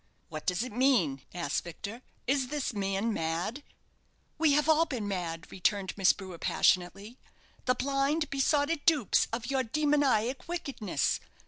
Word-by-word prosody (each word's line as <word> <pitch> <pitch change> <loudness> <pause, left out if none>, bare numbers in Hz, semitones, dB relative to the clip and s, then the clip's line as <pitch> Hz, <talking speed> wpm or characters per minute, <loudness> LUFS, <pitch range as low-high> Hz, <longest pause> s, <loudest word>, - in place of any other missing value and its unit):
"What 155 -1 -7
does 180 +4 +1
it 255 - -6
mean?" 220 - +2
asked 170 -5 -2
Victor. 200 +7 -7 0.2
"Is 265 0 +1
this 290 -2 -2
man 200 +2 -1
mad?" 165 - -2 0.8
"We 310 -3 +4
have 300 +1 +2
all 320 +1 +4
been 235 -8 -3
mad!" 170 -4 -4
returned 195 +1 0
Miss 195 -2 +5
Brewer, 185 -4 -9
passionately. 195 +7 +1 0.5
"The 255 - +3
blind, 275 +4 0
besotted 285 +3 +1
dupes 295 - +4
of 240 +3 -3
your 265 -1 +2
demoniac 270 -2 +1
wickedness! 275 - -1
240 Hz, 140 wpm, -30 LUFS, 190-280 Hz, 0.8 s, Miss